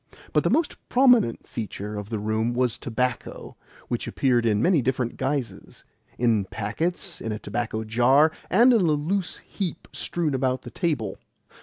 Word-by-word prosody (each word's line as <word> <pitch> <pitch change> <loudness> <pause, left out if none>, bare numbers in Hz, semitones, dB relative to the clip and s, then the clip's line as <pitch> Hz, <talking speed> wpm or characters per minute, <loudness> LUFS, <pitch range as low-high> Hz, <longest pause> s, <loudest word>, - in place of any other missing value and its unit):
But - - +3
the - - +2
most 325 -2 +1
prominent 245 - +4
feature 105 -2 -5
of 105 0 -6
the 115 - -2
room 110 +3 -1
was 125 -2 +1
tobacco, 125 +1 -3 0.3
which - - -3
appeared 120 -3 +2
in 105 -2 +2
many 170 - +3
different 125 -1 -1
guises 135 -2 -4 0.3
in 115 -5 +2
packets, 165 - -3
in 115 - -3
a 105 - -2
tobacco 110 +1 -3
jar, 125 +8 +4 0.2
and 240 +7 +6
in 225 - +4
a 155 -4 +3
loose 180 +5 -2
heap 190 -5 -5
strewn 165 -4 -1
about 130 -1 0
the 120 - -9
table. 145 - -2
125 Hz, 160 wpm, -25 LUFS, 110-165 Hz, 0.3 s, and